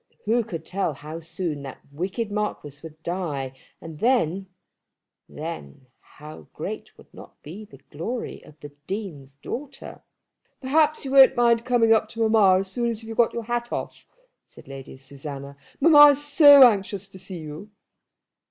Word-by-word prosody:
Who 230 +3 +1
could 165 -8 -8
tell 185 -5 -2
how 155 +3 -9
soon 165 -2 -5
that 135 -1 -10
wicked 190 +8 -4
Marquis 205 -9 -4
would 160 0 -13
die; 150 -7 -4 0.2
and 160 -2 -11
then, 195 -7 +1 0.8
then 75 - -8
how 150 - -14
great - - -7
would - - -20
not - - -15
be 190 +8 -10
the 210 - -16
glory 225 +12 -6
of 150 - -18
the 145 - -9 0.2
Dean's 160 -10 -7
daughter! 275 - -8 0.6
"Perhaps 305 +3 +1
you 265 - -5
won't 270 -1 +7
mind 235 -1 +2
coming 235 -3 +3
up 220 -1 +1
to 225 0 -1
mamma 205 -4 +4
as 195 -1 -6
soon 235 +1 -1
as 225 -1 -5
you 225 - -11
have 225 - -7
got 235 - +3
your 235 - -4
hat 240 +1 -3
off," - - -6 0.4
said - - -17
Lady 135 -1 -10
Susanna. 140 +1 -9 0.2
"Mamma 295 -1 +8
is 290 +1 0
so 285 -2 +8
anxious 200 -2 -2
to 190 -1 -13
see 185 0 -7
you." 155 +5 -9
195 Hz, 165 wpm, -24 LUFS, 150-235 Hz, 0.8 s, Mamma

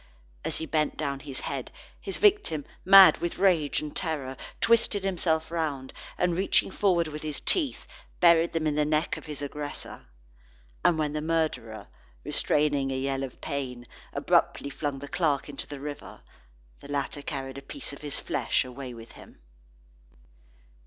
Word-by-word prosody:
As - - 0
he 160 - -3
bent 155 -1 0
down 140 -3 -2
his 135 -1 -6
head, - - -4 0.3
his - - -4
victim, 405 - +3 0.2
mad 195 0 +9
with 170 - -3
rage 165 -7 +3
and 150 - -7
terror, 145 -6 -2 0.2
twisted 225 -3 +3
himself 165 -4 0
round, 150 -6 -2 0.2
and 180 -1 +1
reaching 190 +1 +2
forward 180 -5 +2
with 150 0 -6
his 155 -2 -3
teeth, 305 -8 +1 0.3
buried 170 -1 +5
them 165 -1 0
in 155 - +2
the 150 +1 +2
neck 155 +2 +1
of - - -10
his 145 -1 -5
aggressor. 145 - -6 0.8
And 170 - +4
when 150 -1 0
the 150 - -2
murderer, 155 -9 -1 0.4
restraining 145 -2 +1
a 130 - -1
yell 135 0 -1
of 135 -2 -6
pain, 125 -4 -4 0.3
abruptly 140 - +1
flung 145 -1 -3
the 140 +1 -8
clerk 150 -4 0
into 145 -2 -5
the 145 -1 -7
river, 145 +1 -8 0.6
the - - -12
latter 145 0 -3
carried 135 -1 -5
a - - -12
piece 200 - -6
of 140 - -10
his 145 -2 -4
flesh - - 0
away 125 -1 -7
with 115 0 -11
him. - - -15
150 Hz, 165 wpm, -28 LUFS, 140-165 Hz, 0.8 s, mad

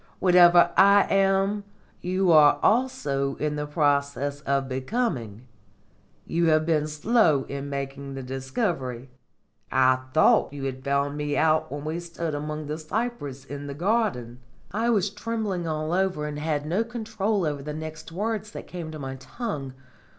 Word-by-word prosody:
Whatever 175 -1 +6
I 200 +1 +7
am, 195 +1 +2 0.4
you 185 0 +1
are 150 -2 +6
also 210 - +1
in 150 0 -2
process 145 -1 0
of 140 -1 +1
becoming. 130 - -3 0.8
You 170 0 +1
have 155 -1 +3
been 155 -2 +1
slow 155 - +2
in 140 +1 -6
making 140 0 -5
the 135 - -6
discovery. 130 - -3 0.6
I 130 0 +4
thought 155 -1 +4
you 140 -1 -6
had 130 -1 -4
found 140 +1 0
me 145 -1 -2
out 155 -3 +2
when 145 +1 -5
we 160 +2 -2
stood 170 -2 -5
among 150 +1 -4
the 150 +2 -4
cypress 155 - -4
in 145 +1 -7
the 140 - -6
garden." 170 - -1 0.3
I 225 +4 0
was 205 -4 +2
trembling 210 -5 -3
all 155 +1 -2
over 185 -5 0
and 150 0 -4
had 150 -1 -1
no 180 +8 +1
control 220 -4 -2
over 145 -2 -2
the 150 +2 -5
next 155 +1 -7
words 215 +3 -3
that - - -7
came 170 -3 -7
to 155 - -7
my 135 -2 -6
tongue. 140 - -5
155 Hz, 155 wpm, -25 LUFS, 140-195 Hz, 0.8 s, I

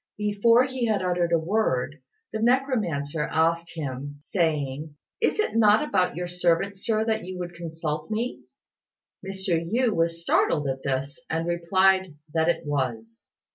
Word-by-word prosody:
Before 210 +4 +4
he 255 -2 -2
had 205 -4 +1
uttered 175 -1 +1
a 170 - +5
word, 155 - 0 0.3
the 220 - -2
necromancer 215 - +1
asked 165 +1 0
him, 145 -2 -5
saying, 150 -3 -1 0.3
"Is - - +1
it 430 - 0
not 220 +4 +5
about 185 -6 +1
your 175 +1 -3
servant, 180 +3 0
Sir, 220 +1 0
that 220 -1 0
you 185 0 -6
would 175 -1 -5
consult 160 -2 -4
me?" 225 +3 -2 0.8
Mr. 190 -3 -1
Yü 235 +7 +1
was 165 -2 0
startled 150 -3 +2
at 135 0 -2
this, 135 +1 -2
and 165 +1 -1
replied 185 +1 +2 0.2
that 160 0 +2
it 170 - 0
was. 120 -6 -3
170 Hz, 150 wpm, -26 LUFS, 155-205 Hz, 0.8 s, a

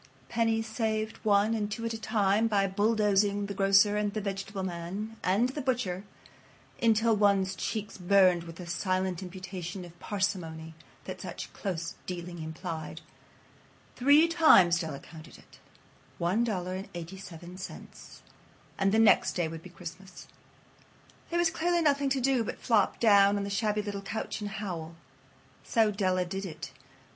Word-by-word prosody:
Pennies 225 -1 +1
saved 220 -1 -2
one 210 +1 +2
and 210 -2 -2
two 230 +2 -4
at 230 - -2
a 225 - -6
time 215 0 +2
by 200 -3 +2
bulldozing 205 0 +2
the 200 - -5
grocer 195 +1 +4
and 210 -1 0
the - - 0
vegetable 195 0 -4
man 190 +5 -5
and 205 +7 +2
the 290 +3 -4
butcher 230 -8 -1 0.8
until 225 0 +4
one's 200 -2 +3
cheeks 210 -1 -4
burned 180 -2 +4
with 165 -1 -9
the 180 - -8
silent 185 +1 -1
imputation 185 -1 -6
of 175 0 -15
parsimony 170 -6 -3 0.3
that - - -7
such - - -7
close 170 -4 -4
dealing 175 -1 -6
implied. 160 0 -6 0.9
Three 285 +6 +5
times 250 - +6
Della 160 -5 -4
counted 160 0 -13
it. - - -19 0.6
One 185 +7 +1
dollar 185 -5 -2
and 190 +1 -6
eighty 175 +2 -7
seven 175 -2 -10
cents. 185 0 -10 0.6
And 195 0 +3
the 220 - +3
next 225 -2 +5
day 175 -2 0
would 160 0 -7
be 185 - -11
Christmas. 180 +2 -10 1.0
There 345 - -1
was 345 -1 +3
clearly 340 +1 +1
nothing 280 -2 +2
to 270 0 +1
do 260 -2 +2
but - - -5
flop 220 -5 +2
down 200 -2 +5
on 200 - -2
the 200 - -4
shabby 210 0 0
little 200 -1 -4
couch 205 +2 -4
and 205 - -3
howl. 175 -6 -5 0.7
So 225 -3 +2
Della 185 -3 0
did 195 +2 -4
it. 160 - -8
200 Hz, 160 wpm, -29 LUFS, 180-220 Hz, 1.0 s, times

